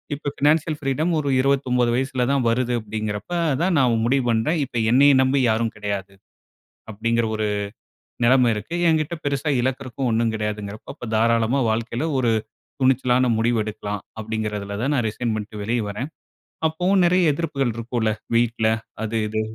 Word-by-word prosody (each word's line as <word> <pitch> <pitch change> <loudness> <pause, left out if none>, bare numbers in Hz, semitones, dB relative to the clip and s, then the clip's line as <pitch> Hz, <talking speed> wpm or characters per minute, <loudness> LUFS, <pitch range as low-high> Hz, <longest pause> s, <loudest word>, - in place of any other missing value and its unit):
இப்ப 145 0 -4
financial 150 +1 +2
freedom 150 +4 0
ஒரு 145 -2 -1
29 130 -3 +2
வயசுல 130 -1 0
தான் 135 -3 +1
வருது 125 +1 0
அப்படிங்கிறப்ப 110 +5 -5 0.3
தான், 180 0 +2
நான் 120 -4 +3
முடிவு 135 +2 +2
பண்ணேன். 115 +9 +1
"இப்ப 120 -2 -4
என்னைய 140 +3 +6
நம்பி 130 +1 +2
யாரும் 115 0 0
கெடையாது" 100 -2 -4 0.8
அப்படிங்கிற 115 +2 0
ஒரு 110 0 -1 0.8
நெலைம 125 -1 +5
இருக்கு. 110 +11 -6
"என்கிட்ட 160 0 +1
பெருசா 140 +1 -1
இழக்கறதுக்கும் 130 0 -2
ஒண்ணும் 115 0 +1
கெடையாது"ங்கிறப்ப 105 -1 -5
அப்ப 120 - -7
தாராளமா 115 +3 +2
வாழ்க்கையில 115 +6 -2
ஒரு 120 -3 +2 0.5
துணிச்சலான 130 -1 +3
முடிவு 115 0 +2
எடுக்கலாம் 105 -1 -5 0.2
அப்படிங்கிறதில 105 -2 -4
தான் 140 +4 +1
நான் 120 -4 +1
ரிசைன் 115 +1 -2
பண்ணிட்டு 105 -1 -6
வெளியே 115 +2 0
வர்றேன். 125 +9 -5 0.6
அப்பவும் 180 +4 +2
நெறைய 175 -3 +4
எதிர்ப்புகள் 140 -6 -1
இருக்கும்ல்ல 115 -1 -1 0.2
வீட்ல 115 -1 +2 0.3
அது 110 +1 -2
இது. 110 +1 -1
120 Hz, 145 wpm, -22 LUFS, 110-140 Hz, 0.8 s, என்னைய